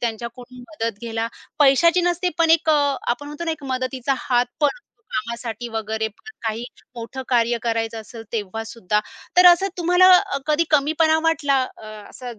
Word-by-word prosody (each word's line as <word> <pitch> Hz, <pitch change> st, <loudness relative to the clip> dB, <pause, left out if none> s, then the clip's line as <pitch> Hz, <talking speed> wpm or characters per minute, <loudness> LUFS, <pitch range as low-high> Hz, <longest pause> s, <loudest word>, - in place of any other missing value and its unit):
त्यांच्याकडून 240 Hz, +2 st, -5 dB
मदत 230 Hz, -9 st, -4 dB
घ्यायला 230 Hz, -1 st, -3 dB, 0.3 s
पैशाची 305 Hz, +5 st, +5 dB
नसते, 355 Hz, +1 st, 0 dB
पण 330 Hz, -1 st, +3 dB
एक 325 Hz, 0 st, +4 dB
अ, 285 Hz, -3 st, +2 dB
आपण 250 Hz, +5 st, -1 dB
म्हणतो 295 Hz, +3 st, -6 dB
ना, 330 Hz, -, -1 dB
एक 305 Hz, -3 st, -6 dB
मदतीचा 255 Hz, +1 st, -1 dB
हात 245 Hz, -1 st, +1 dB
पण 295 Hz, -, +5 dB, 0.4 s
कामासाठी 235 Hz, -2 st, -4 dB
वगैरे 220 Hz, 0 st, -2 dB
पण 220 Hz, -, -18 dB, 0.2 s
काही 225 Hz, +2 st, -2 dB, 0.3 s
मोठं 240 Hz, +3 st, -7 dB
कार्य 235 Hz, -1 st, +2 dB
करायचं 225 Hz, -1 st, -2 dB
असेल, 225 Hz, +1 st, -11 dB
तेव्हासुद्धा. 220 Hz, -1 st, -2 dB, 0.4 s
तर 360 Hz, 0 st, +8 dB
असं 355 Hz, +3 st, +6 dB
तुम्हाला 360 Hz, +2 st, +4 dB
अ, 360 Hz, -, +2 dB
कधी 305 Hz, +2 st, +2 dB
कमीपणा 315 Hz, +2 st, +3 dB
वाटला 320 Hz, -4 st, +2 dB, 0.3 s
अ, -, -, -10 dB, 0.2 s
असंच 245 Hz, -3 st, -9 dB
255 Hz, 160 wpm, -22 LUFS, 230-315 Hz, 0.4 s, तर